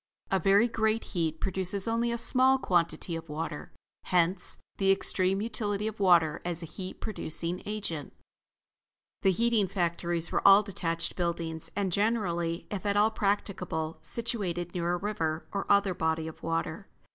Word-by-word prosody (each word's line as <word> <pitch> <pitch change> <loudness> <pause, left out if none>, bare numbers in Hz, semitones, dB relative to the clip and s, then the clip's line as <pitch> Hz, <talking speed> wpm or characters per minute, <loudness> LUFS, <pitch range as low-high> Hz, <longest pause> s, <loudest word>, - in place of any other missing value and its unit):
A 190 - +3
very 200 +6 +4
great 220 -1 0
heat 160 -3 -1
produces 190 +1 -2
only 230 +1 +1
a 235 - -1
small 260 +2 +5
quantity 175 -5 0
of 165 -1 -7
water: 150 0 -5 0.3
hence 180 +1 +2 0.2
the 195 -1 +3
extreme 195 0 +2
utility 210 -2 -1
of 220 -1 -4
water 170 -5 +4
as 175 -1 -2
a - - -4
heat 185 +3 -8
producing 175 -4 -3
agent. 195 -9 -4 1.1
The 195 - +4
heating 225 +1 +2
factories 170 -2 -1
were - - +1
all 200 +2 +8
detached 165 -4 -2
buildings, 165 -2 -3
and 195 -2 -1
generally, 175 -5 0
if 200 -3 -4
at 205 -1 0
all 215 +2 +4
practicable, 190 -6 -2
situated 190 -8 -2
near 175 -1 -1
a - - 0
river, 165 -5 -2
or 200 - -3
other 200 -2 +4
body 160 -1 -1
of 160 - -9
water. 165 +3 -3
185 Hz, 155 wpm, -29 LUFS, 165-205 Hz, 1.1 s, all